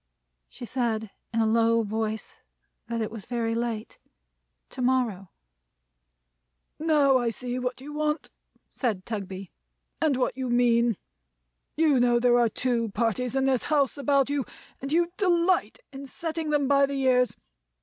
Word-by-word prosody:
She 240 - -9
said, 225 -4 -2 0.2
in 230 -1 +1
a - - +3
low 230 +1 +3
voice, 220 +1 -3 0.5
that 235 -1 -2
it 215 - -3
was 220 -3 -9
very 230 -2 -1
late. 230 -2 -3 0.7
To - - -6
morrow. 245 -7 0 1.5
"Now 295 -4 +4
I 240 -1 0
see 245 +3 -4
what 250 0 -3
you 290 +3 -9
want," 300 +1 -2 0.4
said 215 -8 -2
Tugby; 195 -4 -6 0.5
"and 305 -5 +2
what 255 -1 0
you 260 -1 -3
mean. 240 -2 +3 0.8
You 305 -5 +4
know 240 -1 +4
there 245 0 +4
are 235 -1 +3
two 235 0 -1
parties 230 +4 -1
in 270 0 +2
this 265 -2 +2
house 285 -5 +2
about 280 -1 +2
you, 285 -2 0 0.4
and 275 +1 -5
you 340 +2 +2
delight 360 -2 +2 0.2
in 275 +1 -8
setting 320 +2 -4
them 290 -2 +2
by 280 0 +4
the 275 0 -3
ears. 250 -2 +3
250 Hz, 150 wpm, -26 LUFS, 230-280 Hz, 1.5 s, Now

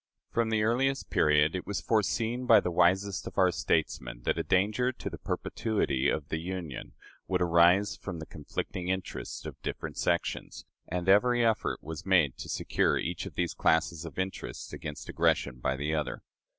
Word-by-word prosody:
From 115 -1 +1
the 110 -1 +2
earliest 135 +5 +1
period, 75 +2 +4
it 90 - -4
was 100 - -2
foreseen 115 +3 0
by 115 -2 +8
the 90 - -2
wisest 95 +3 +2
of - - -9
our 95 -2 +5
statesmen - - -1
that - - 0
a - - 0
danger 105 +7 +2
to - - -6
the - - -8
perpetuity 100 - -1
of 75 -1 -2
the 80 - -1
Union 85 -4 -6 0.3
would - - +1
arise 90 +3 +4
from 90 -4 -6
the 80 - -7
conflicting 85 +4 -5
interests 95 0 -4
of - - -8
different - - -5
sections, 85 -1 -1 0.2
and 90 +1 -3
every 120 +5 +5
effort 110 -1 0
was 80 0 -6
made 85 -9 +3
to - - -7
secure - - +1
each 90 +2 -3
of 85 - -11
these 85 -2 -1
classes 80 0 +1
of 85 - -9
interests 95 +1 -4
against 75 -1 -7
aggression 65 - +1
by 65 +2 0
the 75 +3 -2
other. 75 -2 -2
90 Hz, 175 wpm, -29 LUFS, 80-105 Hz, 0.3 s, by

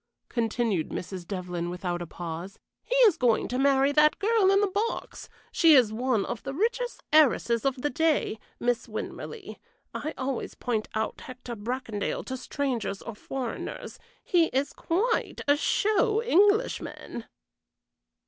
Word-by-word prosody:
continued 225 -6 0
Mrs. 180 -1 -6
Devlyn, 180 -3 -3
without 175 -1 -3
a 175 - -5
pause. 170 +3 -7 0.3
"He - - -2
is 390 -7 +4
going 245 -6 +2
to 250 - -1
marry 275 0 +4
that 300 +1 +4
girl 420 -1 +3
in 395 0 +5
the 410 - +3
box; 415 +5 -3 0.2
she 325 -3 +6
is 235 -5 +5
one 235 -3 0
of 240 - -5
the 275 0 -5
richest 480 +6 -1
heiresses 245 -6 +4
of 265 -2 -1
the 295 - +1
day 320 -9 +1 0.2
Miss 240 -1 0
Winmarleigh. 380 - -7 0.4
I 310 +2 -4
always 260 -1 -3
point 225 -4 -2
out 220 0 -2
Hector 250 -1 -8
Bracondale 225 -1 -3
to 260 - -4
strangers 255 -6 -3
or 230 - -6
foreigners; 250 +3 -6 0.2
he 345 -2 +3
is 275 -1 -1
quite 430 +8 -1
a 285 - +6
show 430 +7 +2
Englishman." 415 +1 +1
260 Hz, 145 wpm, -27 LUFS, 220-335 Hz, 0.4 s, she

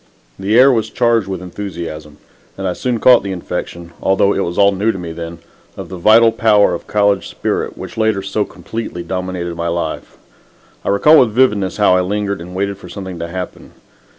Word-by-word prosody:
The 105 +4 +1
air 135 +2 +7
was 115 -4 0
charged 115 -4 +1
with 95 -2 -5
enthusiasm, 85 -5 -7 0.4
and 95 0 -3
I 90 - -1
soon 125 +2 -2
caught 125 +1 +6
the 100 0 -5
infection 85 -1 -6
although 100 +1 +2
it - - -2
was 85 - -4
all 100 0 +5
new 100 +3 +1
to 95 - -7
me 85 -2 -6
then 85 0 -7 0.4
of - - -7
the 95 - -7
vital 115 +5 +6
power 105 -4 +3
of 85 - -6
college 100 -2 +1
spirit - - -3
which - - -9
later 110 -3 +1
so 100 +2 -1
completely 110 -5 -6
dominated 90 -2 -4
my 85 0 -3
life. 85 -2 -4 0.7
I - - -2
recall 150 +11 +6
with 115 -4 +3
vividness 105 -7 +2
how 100 -3 +4
I 90 - +3
lingered 100 0 -2
and 90 +2 -9
waited 100 +1 -2
for 90 - -12
something 95 -2 -7
to 85 - -4
happen. 90 +1 -7
95 Hz, 200 wpm, -17 LUFS, 90-105 Hz, 0.7 s, air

